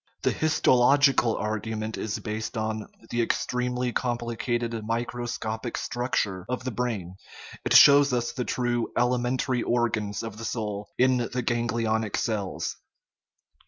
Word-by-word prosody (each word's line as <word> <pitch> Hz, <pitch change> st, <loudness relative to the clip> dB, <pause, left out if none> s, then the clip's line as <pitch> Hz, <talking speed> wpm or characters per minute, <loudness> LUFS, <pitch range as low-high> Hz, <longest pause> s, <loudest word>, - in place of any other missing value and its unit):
The -, -, +3 dB
histological 135 Hz, -5 st, +4 dB
argument 110 Hz, 0 st, -3 dB
is 105 Hz, -1 st, -3 dB
based 110 Hz, +1 st, -4 dB
on 110 Hz, -1 st, -2 dB, 0.2 s
the 120 Hz, -, +1 dB
ex 115 Hz, -, 0 dB
tremely 125 Hz, 0 st, -1 dB
complicated 120 Hz, -1 st, -1 dB
microscopic 115 Hz, 0 st, -3 dB
structure 110 Hz, -7 st, -1 dB
of 125 Hz, 0 st, -2 dB
the 130 Hz, -, -3 dB
brain; 105 Hz, -7 st, -3 dB, 0.5 s
it -, -, +2 dB
shows 140 Hz, 0 st, +8 dB
us 120 Hz, -1 st, 0 dB
the 125 Hz, -, -3 dB
true 120 Hz, -1 st, -1 dB
" -, -, -8 dB
elementary 125 Hz, +1 st, +1 dB
organs 115 Hz, -4 st, 0 dB
of 110 Hz, -1 st, -7 dB
the 115 Hz, -, -5 dB
soul 105 Hz, -3 st, -3 dB
" -, -, -48 dB
in 130 Hz, 0 st, +4 dB
the 125 Hz, +1 st, -2 dB
ganglionic 115 Hz, -2 st, 0 dB
cells. 105 Hz, -5 st, -2 dB
120 Hz, 135 wpm, -26 LUFS, 110-125 Hz, 0.5 s, shows